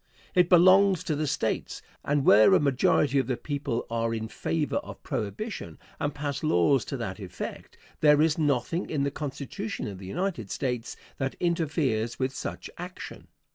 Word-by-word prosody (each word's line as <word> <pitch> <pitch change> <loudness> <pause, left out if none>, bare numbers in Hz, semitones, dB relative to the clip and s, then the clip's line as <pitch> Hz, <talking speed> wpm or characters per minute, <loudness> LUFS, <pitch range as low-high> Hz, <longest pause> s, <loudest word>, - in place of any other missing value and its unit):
It 180 -2 +4
belongs 185 +1 +6
to 160 -4 -1
the 150 +1 -1
States; - - -2 0.2
and 145 -1 +1
where 105 +1 +7
a - - +5
majority 140 0 +3
of 130 - -1
the 125 -2 -1
people 140 -5 -3
are 115 0 -1
in 110 0 -4
favor 155 +4 -1
of - - -7
prohibition 105 - -4 0.2
and 145 - 0
pass 145 -1 -4
laws 135 - +3
to 135 - -4
that 95 -5 -5
effect, 90 -3 -7 0.2
there 150 -1 +5
is 155 0 +4
nothing 150 +3 0
in 145 -3 0
the 140 - 0
Constitution 150 +9 -5
of 100 -3 -7
the 95 - -9
United 165 - -3
States 125 -1 -3 0.2
that 135 0 -2
interferes 150 -9 0
with 130 0 -1
such - - -5
action. 180 +1 -8
140 Hz, 170 wpm, -27 LUFS, 115-165 Hz, 0.2 s, where